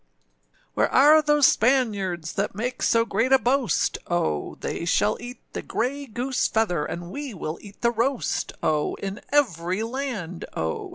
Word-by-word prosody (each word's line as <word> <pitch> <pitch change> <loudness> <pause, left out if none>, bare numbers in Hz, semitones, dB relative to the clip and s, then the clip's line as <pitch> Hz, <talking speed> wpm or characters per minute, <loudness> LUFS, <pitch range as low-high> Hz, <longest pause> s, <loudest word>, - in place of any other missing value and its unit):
Where - - +2
are 300 +4 +7
those 295 -1 +4
Spaniards 205 -11 +2
That - - -2
make 245 +4 -3
so 230 0 +3
great 230 +4 0
a 265 - +8
boast, 250 - +1
O? 80 - -1
They - - -4
shall 205 +4 +2
eat 245 +1 -8
the - - -3
grey 275 +4 -2
goose 250 +3 -1
feather, 195 -9 0
And 175 +1 -6
we 280 -3 -6
will 160 -2 -5
eat 205 -1 -14
the 235 - +3
roast, 240 +3 -1
O! 155 -1 +1
In 195 +2 -6
every 185 - +1
land, 225 -9 -4
O! 80 0 -3
225 Hz, 160 wpm, -25 LUFS, 180-265 Hz, -, a